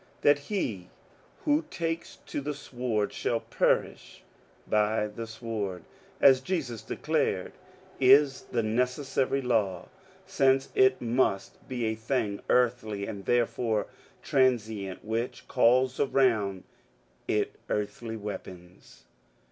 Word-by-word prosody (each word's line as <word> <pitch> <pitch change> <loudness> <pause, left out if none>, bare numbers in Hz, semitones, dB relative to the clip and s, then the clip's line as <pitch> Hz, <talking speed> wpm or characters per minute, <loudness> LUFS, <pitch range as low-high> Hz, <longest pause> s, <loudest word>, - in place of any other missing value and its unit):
^^ - - -31
That 145 0 +5
he 120 - -3 0.6
who 300 +2 +3
takes 165 -1 -3
to - - -4
the 145 +1 -3
sword 120 -6 -2
shall 115 - -1
perish - - -1 0.4
by 105 0 +2
the 110 +2 -6
sword, 110 -6 -4 0.4
as 130 -1 +6
Jesus 130 - -3
declared, - - -1 0.5
is 135 +1 +5
the 115 -2 0
neces 125 +6 0
sary 135 0 0
law, 110 -7 0 0.4
since 135 -8 +2
it 130 -1 +4
must 115 -5 0
be 125 -3 -2
a 110 - 0
thing 110 -2 -2
earthly 115 -5 +1
and 100 -2 -7
therefore 120 -2 +1 0.4
tran 130 -2 +4
sient 105 -4 -7
which 115 +3 -3
calls 125 +1 +3
around 110 -9 +2 0.6
it - - 0
earthly 110 +2 -3
weapons." 90 -4 -9
120 Hz, 115 wpm, -28 LUFS, 105-130 Hz, 0.6 s, as